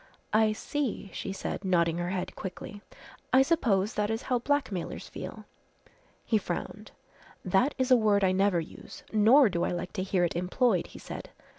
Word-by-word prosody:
"I 215 0 +4
see," 230 -5 -3
she - - -4
said, 195 - -4
nodding 170 -3 +2
her 175 0 -2
head 185 0 -3
quickly. 195 +2 -7 0.5
"I 260 +1 +6
suppose 225 - +1
that 210 0 0
is 225 0 -2
how 250 -2 0
blackmailers 260 -9 -2
feel." - - -8 0.8
He 220 - +2
frowned. - - -5 0.6
"That 190 +10 +2
is 260 -1 0
a - - +9
word 210 -3 +3
I 185 - +4
never 190 -1 +2
use, 165 - -10
nor 230 +6 +6
do 175 -4 -1
I - - 0
like 175 0 -4
to - - -2
hear 185 -1 +1
it 170 - 0
employed," 180 +2 +1
he - - -12
said. - - -8
200 Hz, 175 wpm, -29 LUFS, 185-240 Hz, 0.8 s, a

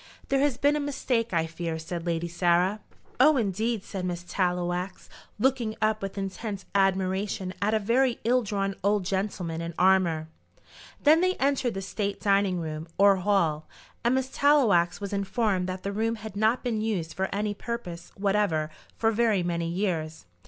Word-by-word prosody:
"There 275 - +2
has 280 -3 +2
been 285 +1 +3
a - - 0
mistake, 255 -5 -1
I 165 -2 +1
fear," 165 0 -4
said 165 +1 -5
Lady 170 0 -1
Sarah. 175 +3 +2 0.4
"Oh, 295 +3 +6
indeed," 220 0 -1
said 190 -3 -5
Miss 175 -1 -3
Tallowax, 180 0 -2 0.3
looking 240 -2 +1
up 215 0 +1
with 195 0 -5
intense 195 0 -4
admiration 190 0 0
at 210 +2 +2
a - - +4
very 235 +4 +1
ill 250 +2 +3
drawn 195 -2 -2
old 200 -1 +2
gentleman 185 -4 -2
in 170 -1 -5
armour. 180 -4 +3 0.8
Then 310 +3 +6
they 370 0 +2
entered 270 -4 0
the 195 - -4
state 200 +2 -3
dining 195 -2 +2
room 155 0 -5
or 200 0 +6
hall, 175 -6 +1 0.4
and 240 +2 +3
Miss 265 0 -1
Tallowax 200 -12 +3
was 200 0 -5
informed 200 -2 0
that 185 0 -5
the 200 - -2
room 225 +2 0
had 215 -2 -9
not 220 +4 +2
been 230 -4 -1
used 190 -7 -2
for 190 0 -2
any 205 +1 -1
purpose 200 -7 -6
whatever 195 -6 +1 0.3
for 225 0 +2
very 220 -4 +2
many 170 -1 -1
years. 165 - -2
195 Hz, 170 wpm, -27 LUFS, 175-225 Hz, 0.8 s, Oh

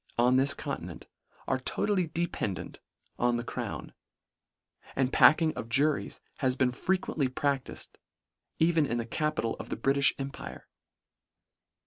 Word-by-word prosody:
on 125 +2 +4
this 135 +2 +3
continent, - - -6 0.4
are 130 - +1
totally 185 +6 0
dependant 160 - -3 0.4
on 120 0 +2
the 120 - -3
crown; - - -5 1.0
and 130 -1 +1
packing 155 0 +6
of 115 - -6
juries 140 +5 +1 0.2
has 130 -3 +1
been 130 -2 +2
frequently 160 0 0
pradtifed 140 0 -3 0.6
even 160 -2 +3
in 120 - -1
the 115 - -2
capital 150 -2 -1
of - - -7
the - - -3
Britiih 135 +4 +3
empire. 135 0 -7
135 Hz, 125 wpm, -29 LUFS, 125-155 Hz, 1.0 s, packing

